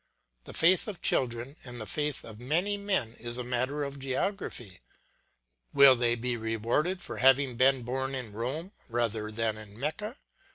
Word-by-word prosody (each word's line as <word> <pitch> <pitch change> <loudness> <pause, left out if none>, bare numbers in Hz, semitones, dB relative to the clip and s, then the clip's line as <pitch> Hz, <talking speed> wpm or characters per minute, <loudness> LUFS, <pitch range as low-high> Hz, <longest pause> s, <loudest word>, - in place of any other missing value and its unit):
The - - -10
faith 180 +5 +4
of 195 -5 -7
children 125 +3 0
and 120 -2 -8
the 110 - -5
faith 150 +3 -1
of 110 -1 -10
many 170 +11 0
men 195 - -1
is 120 +1 -3
a 125 - -3
matter 130 +4 -1
of 140 0 -5
geography. 130 - -3 1.0
Will 140 -2 +9
they 120 -1 +2
be 120 +1 -1
rewarded 115 - -1
for - - -6
having 135 0 +4
been 130 +1 +4
born 130 +2 -2
in 120 -5 -5
Rome 135 - -3 0.2
rather 115 -2 -1
than 110 0 -1
in 105 0 -11
Mecca? 210 - -3
125 Hz, 165 wpm, -29 LUFS, 115-150 Hz, 1.0 s, Will